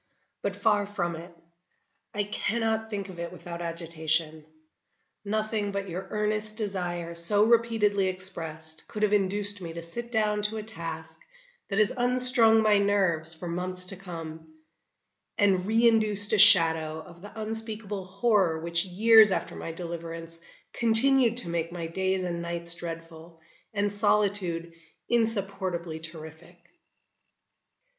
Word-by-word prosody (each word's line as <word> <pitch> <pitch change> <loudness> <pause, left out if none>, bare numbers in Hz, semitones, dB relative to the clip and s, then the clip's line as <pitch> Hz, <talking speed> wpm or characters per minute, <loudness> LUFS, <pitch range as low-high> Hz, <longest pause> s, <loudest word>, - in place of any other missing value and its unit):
But 200 -1 -3
far 205 0 +1
from 175 -4 -3
it; 170 +2 -11 0.8
I 205 - -2
cannot 220 +1 -2
think 200 -2 -5
of 180 -2 -11
it 170 0 -5
without 175 -1 -9
agitation. 160 -2 -3 0.8
Nothing 215 0 -2
but 200 -1 -5
your 180 +3 -6
earnest 215 0 -2
desire 175 -5 -3
so 170 +5 +1
repeatedly 220 -4 +2
expressed, 160 -4 -6
could 210 - -5
have 210 -1 +2
induced 205 0 +2
me 165 -2 -7
to 170 0 -8
sit 235 +8 -8
down 210 -2 0
to 210 +1 -2
a 215 - -5
task 165 -6 -8 0.5
that 195 - -3
has 215 -1 +2
unstrung 245 -3 +5
my 210 -1 +3
nerves 180 -6 +1
for 175 +2 -8
months 180 +1 -3
to 195 - -3
come, 165 -4 -9 0.9
and 195 -3 +1
reinduced 220 -2 +4
a 215 - +2
shadow 160 -6 +7
of 170 0 -16
the 205 +3 -11
unspeakable 215 -2 -5
horror 190 -4 +1
which 170 +1 0
years 215 +3 +5
after - - -3
my 165 - -6
deliverance 165 -1 -8 0.3
continued 235 +1 +4
to 215 - -1
make 170 0 -3
my 170 -1 -6
days 190 +2 -2
and 170 -1 -4
nights 170 0 -1
dreadful, 165 -1 -9 0.3
and 205 -1 -1
solitude 200 -5 0 0.4
insupportably 195 -7 -2
terrific. 160 +2 -12
190 Hz, 135 wpm, -26 LUFS, 170-215 Hz, 0.9 s, shadow